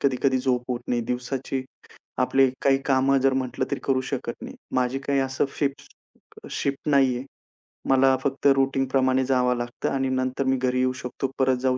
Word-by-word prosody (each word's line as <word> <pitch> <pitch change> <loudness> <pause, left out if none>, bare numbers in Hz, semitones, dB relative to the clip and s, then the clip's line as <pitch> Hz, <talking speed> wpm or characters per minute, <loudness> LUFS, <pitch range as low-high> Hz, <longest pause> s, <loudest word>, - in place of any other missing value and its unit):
कधी-कधी 130 -1 +2
झोप 125 -1 0
होत 120 -1 -2
नाही. 120 - +1
दिवसाची 130 +2 -3 0.6
आपले 135 -1 +4
काही 135 -1 +4
कामं 135 0 +3
जर 135 0 +3
म्हटलं 130 -1 -1
तरी 140 - -2
करू 135 -1 +2
शकत - - -4
नाही. - - -7 0.2
माझी 130 +1 +1
काही 140 -1 +1
असं 130 0 0
शिफ्ट 140 -2 -4 0.4
शिफ्ट 140 +1 -2
नाहीये. 130 -3 +3 0.7
मला 135 0 +5
फक्त 140 +1 0
रूटीनप्रमाणे 135 -1 +1
जावं 125 -1 +2
लागतं 120 0 -3
आणि 135 -1 0
नंतर 130 +1 -1
मी 130 0 +2
घरी 125 0 0
येऊ 130 0 +2
शकतो, 130 +2 -4
परत 130 -1 +3
जाऊ 130 -1 +1
130 Hz, 170 wpm, -25 LUFS, 130-135 Hz, 0.7 s, मला